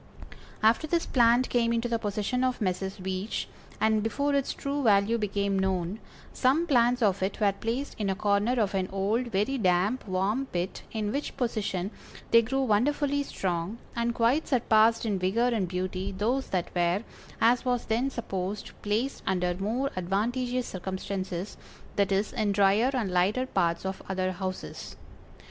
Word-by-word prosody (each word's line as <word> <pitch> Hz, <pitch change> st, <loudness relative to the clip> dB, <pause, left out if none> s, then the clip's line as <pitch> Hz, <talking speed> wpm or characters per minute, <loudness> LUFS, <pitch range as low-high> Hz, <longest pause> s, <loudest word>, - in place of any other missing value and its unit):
After 225 Hz, +8 st, +4 dB
this 335 Hz, +1 st, +1 dB
plant 240 Hz, 0 st, +4 dB
came 235 Hz, -1 st, +2 dB
into 235 Hz, +1 st, 0 dB
the 230 Hz, -1 st, 0 dB
possession 210 Hz, +4 st, -1 dB
of 255 Hz, -1 st, 0 dB
Messrs. 190 Hz, -1 st, -2 dB
Veitch, 190 Hz, +2 st, -3 dB, 0.3 s
and 220 Hz, -1 st, +3 dB
before 280 Hz, +6 st, 0 dB
its 280 Hz, -1 st, +1 dB
true 280 Hz, +1 st, -3 dB
value 215 Hz, -1 st, +3 dB
became 200 Hz, -1 st, 0 dB
known, 190 Hz, +1 st, -1 dB, 0.3 s
some 275 Hz, +7 st, +2 dB
plants 245 Hz, -4 st, +3 dB
of 195 Hz, -2 st, +2 dB
it 190 Hz, +4 st, -2 dB
were 205 Hz, -2 st, +4 dB
placed 230 Hz, +7 st, -3 dB
in 205 Hz, -2 st, 0 dB
a 190 Hz, -, 0 dB
corner 205 Hz, +3 st, +2 dB
of 205 Hz, -3 st, +1 dB
an 190 Hz, -1 st, -1 dB
old, 205 Hz, +6 st, 0 dB
very 225 Hz, +5 st, 0 dB
damp, 195 Hz, +5 st, +1 dB
warm 200 Hz, +8 st, 0 dB
pit, 180 Hz, -2 st, -3 dB
in 215 Hz, -2 st, -2 dB
which 280 Hz, +3 st, -3 dB
position 210 Hz, -6 st, -1 dB, 0.4 s
they 230 Hz, -, +8 dB
grew 270 Hz, +4 st, -1 dB
wonderfully 285 Hz, +5 st, +2 dB
strong, 185 Hz, -5 st, -3 dB, 0.2 s
and 235 Hz, 0 st, 0 dB
quite 245 Hz, +7 st, +2 dB
surpassed 225 Hz, -3 st, +3 dB
in 205 Hz, -4 st, 0 dB
vigor 215 Hz, +7 st, +2 dB
and 220 Hz, -6 st, 0 dB
beauty 185 Hz, +2 st, -3 dB
those 230 Hz, +8 st, -1 dB
that 180 Hz, -3 st, -2 dB
were, 175 Hz, +4 st, +1 dB, 0.4 s
as 240 Hz, +2 st, +4 dB
was 250 Hz, -2 st, 0 dB
then 235 Hz, +5 st, +1 dB
supposed, 200 Hz, -5 st, -4 dB
placed 220 Hz, +6 st, -1 dB
under 180 Hz, -1 st, +1 dB
more 225 Hz, +9 st, -1 dB
advantageous 240 Hz, +7 st, -1 dB
circumstances, 190 Hz, 0 st, -4 dB, 0.4 s
i.e., 195 Hz, 0 st, +2 dB
in 215 Hz, -4 st, +1 dB
dryer 200 Hz, +5 st, +4 dB
and 220 Hz, -7 st, -1 dB
lighter 195 Hz, +8 st, +2 dB
parts 170 Hz, -7 st, 0 dB
of 190 Hz, 0 st, -3 dB
other 185 Hz, -1 st, 0 dB
houses. 185 Hz, 0 st, -6 dB
210 Hz, 160 wpm, -28 LUFS, 190-245 Hz, 0.4 s, they